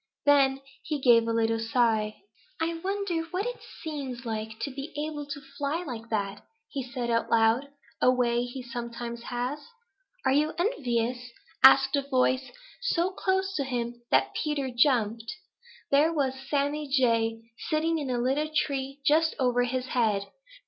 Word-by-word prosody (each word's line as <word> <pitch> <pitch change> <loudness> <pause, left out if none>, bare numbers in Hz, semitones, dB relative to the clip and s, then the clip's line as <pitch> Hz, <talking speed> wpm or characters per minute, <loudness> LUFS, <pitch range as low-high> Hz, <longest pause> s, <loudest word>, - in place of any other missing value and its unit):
Then 275 -2 +4 0.2
he 300 -2 -3
gave 235 -3 +5
a - - +1
little 225 0 +1
sigh. 225 - +1 0.4
"I 325 +1 0
wonder 390 -3 -1
what 370 +5 -2
it - - -4 0.2
seems 270 -6 -5
like 220 -1 -4
to 280 - -2
be 275 +3 -7
able 295 -1 -4
to 285 - -5
fly 285 +4 -3
like 230 -7 -7
that," 205 -2 -2 0.5
said 245 -3 -3
he - - +1
out 230 - 0
loud, 230 +4 +3 0.3
a - - +6
way 240 -1 +2
he 245 +1 -6
sometimes 235 0 -6
has. 250 +4 -2 0.7
"Are - - +4
you 300 +2 +2
envious?" 250 - 0 0.4
asked 270 +1 +8
a 280 - +2
voice 260 -1 +1 0.3
so 350 +2 +1
close 380 0 0
to 280 - +1
him 240 -2 -3
that 135 0 +3
Peter 285 -4 -1
jumped. 230 -3 +2 0.6
There 295 +4 +5
was 280 -5 0 0.2
Sammy 290 +1 0
Jay 230 -3 +1 0.2
sitting 320 +1 +1
in 285 -3 -4
a 250 - 0
little 270 +5 0
tree 275 -2 -1
just 320 +2 +3
over 245 -1 +2
his 255 +1 -3
head. 215 -5 +1
260 Hz, 155 wpm, -28 LUFS, 235-295 Hz, 0.7 s, asked